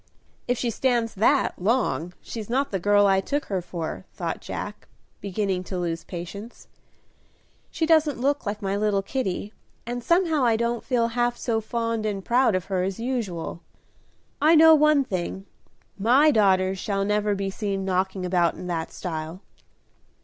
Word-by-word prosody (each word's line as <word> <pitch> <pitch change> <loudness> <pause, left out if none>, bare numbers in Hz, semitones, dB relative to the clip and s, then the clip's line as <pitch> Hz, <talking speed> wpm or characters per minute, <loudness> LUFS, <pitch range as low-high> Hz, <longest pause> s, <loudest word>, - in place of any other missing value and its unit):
"If 245 0 +1
she 235 0 -1
stands 235 -1 0
that 235 +1 +2
long 180 - 0
she's 220 -2 -7
not 270 +4 0
the 195 - -1
girl 205 +2 +4
I 195 -1 +4
took 290 +8 -2
her 190 -3 -2
for," 165 - -5
thought - - -4
Jack, - - -6 0.3
beginning 195 -1 -2
to 185 - -4
lose 170 -2 -2
patience. 200 +6 -8 1.0
"She 330 - -1
doesn't 315 -4 +3
look 280 +3 0
like 205 -1 -4
my 195 0 -1
little 205 -1 +1
Kitty, 210 -3 -3 0.3
and 240 +1 -4
somehow 335 -3 +2
I 230 -2 +4
don't 235 +1 -1
feel 235 -3 +1
half 240 +1 0
so 225 -2 -1
fond 230 0 -2
and 195 -2 -4
proud 245 -3 +3
of 185 -1 -2
her 190 -2 -1
as 190 +2 -2
usual. 225 -10 -3 0.8
I 315 +3 +6
know 320 0 +8
one 305 -2 +5
thing, 190 -3 -4 0.5
my 260 +9 +5
daughters 190 -4 +3
shall 195 0 -1
never 210 0 +1
be 195 0 -2
seen 195 -2 -3
knocking 190 0 -1
about 175 -2 +2
in - - -8
that 170 -2 -3
style." 165 0 -5
210 Hz, 165 wpm, -25 LUFS, 190-245 Hz, 1.0 s, know